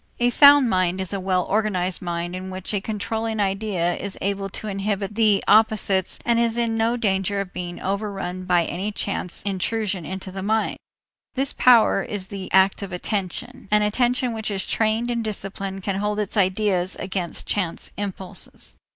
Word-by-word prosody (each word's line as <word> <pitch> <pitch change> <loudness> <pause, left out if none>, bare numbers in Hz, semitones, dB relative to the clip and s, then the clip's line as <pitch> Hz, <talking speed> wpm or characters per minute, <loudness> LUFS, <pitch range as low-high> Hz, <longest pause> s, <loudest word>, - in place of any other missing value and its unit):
A 245 0 +3
sound 285 0 +8
mind 185 -3 +1
is 190 +1 -3
a 200 - -1
well 185 -1 +1
organized 190 -4 0
mind 175 0 -3
in 185 +1 -6
which 185 +2 -5
a 200 - 0
controlling 220 +1 -3
idea 195 -3 0
is 200 0 -6
able 195 0 -2
to 215 - -5
inhibit 200 0 -2
the 210 -2 +3
opposites 210 -3 +3
and 235 -1 +3
is 235 0 +1
in 230 -1 +1
no 225 +2 +1
danger 200 -3 0
of 195 -2 -4
being 175 -1 -5
overrun 195 -2 -3
by 175 -2 +3
any 190 +6 -3
chance 200 -3 -3
intrusion 200 -1 -1
into 190 +3 -6
the 190 +1 -5
mind. 220 +3 0 0.6
This 270 +1 0
power 235 -5 +5
is 195 -2 -5
the 195 -2 -7
act 190 +1 +4
of 195 -1 -5
attention. 195 +6 -4
An 210 0 +4
attention 245 +3 +1
which 220 -1 -3
is 195 -2 -2
trained 225 +2 0
and 235 -1 -1
disciplined 195 -2 -5
can 195 0 -1
hold 210 +1 -1
its 210 -2 -2
ideas 190 -2 +1
against 185 -3 -4
chance 185 -5 -2
impulses. 195 -2 -4
200 Hz, 175 wpm, -23 LUFS, 185-220 Hz, 0.6 s, sound